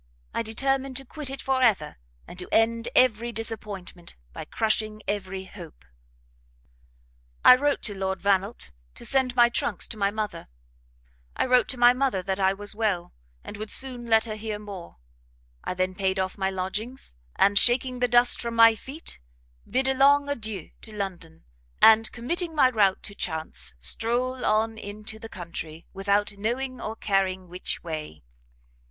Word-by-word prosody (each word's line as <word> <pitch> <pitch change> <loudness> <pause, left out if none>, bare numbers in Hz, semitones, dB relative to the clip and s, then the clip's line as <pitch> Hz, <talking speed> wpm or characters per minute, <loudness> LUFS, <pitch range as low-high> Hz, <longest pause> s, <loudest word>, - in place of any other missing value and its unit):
I - - 0
determined 265 +3 -1
to 270 - -5
quit 295 +1 -6
it 270 - -6
for 265 -1 +1
ever, 205 -12 +2 0.3
and 180 - -10
to 180 - -5
end 230 +1 +2
every 240 -2 +3
disappointment, 210 -6 -5 0.2
by - - -7
crushing 215 -1 -1
every 190 -2 -3
hope. 60 - -12 1.6
"I 250 - +11
wrote 285 +2 0
to 205 - -1
Lord 190 0 -2
Vannelt 200 - 0 0.2
to - - -9
send 260 -2 +1
my 240 -1 +7
trunks 240 - -1
to 220 - -6
my 200 -1 +2
mother; 205 -5 -4 0.9
I - - +1
wrote 250 -1 +4
to 260 - -3
my 245 0 +7
mother 250 -8 0
that 190 +1 -2
I 190 0 +4
was 205 +1 -5
well, 210 -5 -1 0.3
and 210 - -8
would 215 0 -6
soon 250 -1 0
let 225 0 +4
her 220 - -4
hear 215 -1 -4
more: 200 - -9 0.7
I - - -3
then 185 0 0
paid 190 0 -1
off 190 0 -1
my 190 -1 0
lodgings, 195 - -4 0.2
and 200 0 +4
'shaking 250 +1 +2
the 250 - +2
dust 240 +1 +5
from 235 -1 -4
my 230 0 +8
feet,' 270 +8 -8 0.5
bid 260 +3 +1
a 265 - +3
long 285 +2 +5
adieu 215 - -4
to 220 - -8
London; 175 -5 -6 0.4
and, 225 0 +6
committing 325 +7 -3
my 260 -4 +5
route 200 -5 +2
to 205 - -5
chance, 160 - -3
strole 240 - -1
on 220 +1 +1
into 215 +1 -7
the 225 - -9
country, 165 -3 -7
without 200 +2 +1
knowing 250 +3 -2
or 220 0 -4
caring 190 -3 0
which 180 +1 -5
way. 155 - -6
215 Hz, 165 wpm, -26 LUFS, 190-245 Hz, 1.6 s, I